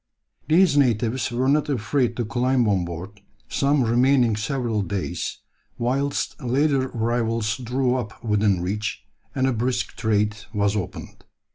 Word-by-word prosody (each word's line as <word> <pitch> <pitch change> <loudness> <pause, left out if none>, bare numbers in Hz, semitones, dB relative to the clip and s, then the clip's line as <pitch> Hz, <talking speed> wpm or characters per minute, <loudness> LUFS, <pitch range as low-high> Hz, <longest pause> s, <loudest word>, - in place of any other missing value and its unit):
These 165 -1 +4
natives 120 -2 +2
were 125 +2 0
not 150 +2 +2
afraid 120 -1 0
to 120 - -1
climb 125 +1 +1
on 95 -4 +1
board, 90 +4 -8 0.3
some 140 -1 +2
remaining 120 0 +3
several 115 -1 -1
days, 95 0 -3 0.4
whilst 135 +4 -1
later 135 +2 +1
arrivals 115 -1 -1
drew 125 0 0
up 120 -4 -4
within 105 -4 +2
reach, 105 +4 -3 0.3
and 130 - +1
a 130 - +2
brisk 120 +2 -1
trade 105 -1 +1 0.2
was 100 0 +1
opened. 95 -5 -6
120 Hz, 135 wpm, -23 LUFS, 105-130 Hz, 0.4 s, These